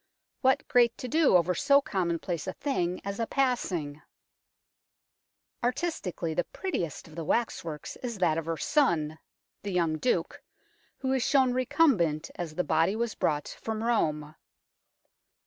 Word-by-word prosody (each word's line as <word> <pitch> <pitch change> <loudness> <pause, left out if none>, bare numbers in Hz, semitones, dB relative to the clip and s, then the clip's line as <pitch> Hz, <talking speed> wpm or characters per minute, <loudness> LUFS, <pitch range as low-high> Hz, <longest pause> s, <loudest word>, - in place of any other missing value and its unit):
What 265 0 +2
great 240 -2 +4
to 255 - -5
do 300 - +5
over 180 +1 +1
so 280 - +4
commonplace 175 - -2
a 185 - -2
thing 180 -11 -2
as 200 +1 -4
a 230 - 0
passing! 185 - -1 1.6
Artistically, 245 - -2
the 175 - +1
prettiest 175 - -4
of 160 - -15
the 165 +1 -5
waxworks 165 -6 -2
is 235 -4 -5
that 165 -4 +2
of 165 - -7
her 165 -1 -1
son, 160 - +1 0.4
the 200 - -4
young 165 -3 +1
Duke, 250 - 0 0.6
who 265 0 -1
is 265 - +1
shown 260 0 +3
recumbent, 250 - +2
as 165 -3 -6
the 180 - +1
body 165 +5 +2
was 235 0 -1
brought 150 -1 -1
from 220 0 -3
Rome. 155 -10 0
185 Hz, 145 wpm, -28 LUFS, 165-250 Hz, 1.6 s, do